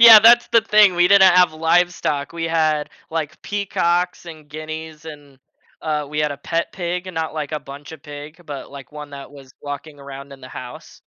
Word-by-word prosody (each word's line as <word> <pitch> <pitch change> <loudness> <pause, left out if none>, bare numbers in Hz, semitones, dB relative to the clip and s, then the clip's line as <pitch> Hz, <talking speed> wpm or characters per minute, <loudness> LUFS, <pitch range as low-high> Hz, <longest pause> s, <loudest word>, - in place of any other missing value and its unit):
Yeah, 230 -2 +12
that's 235 +2 +6
the 230 - +5
thing. 210 -4 +5
We 175 0 +4
didn't 190 -2 +7
have 180 -3 +5
livestock. 165 -3 0
We 165 -1 -4
had, 155 -2 0 0.2
like, 160 -1 -4
peacocks, 180 -3 -1
and 155 -3 -11
guineas, 155 +1 -8
and 145 -4 -12 0.4
uh, 150 -2 -2
we 150 +1 -5
had 150 -1 +1
a - - -8
pet 165 +4 -3
pig 180 0 -4
and 185 - -8
not 160 -1 -3
like 155 0 -4
a 150 - -2
bunch 140 +2 -11
of 155 -2 -12
pig, 150 +3 -10
but 145 -2 -7
like 140 +1 -11
1 150 -1 -9
that 140 0 -10
was 135 -2 -14
walking 145 +1 -7
around 140 0 -10
in 135 - -13
the 130 - -11
house. 125 -1 -10
155 Hz, 205 wpm, -20 LUFS, 145-175 Hz, 0.4 s, Yeah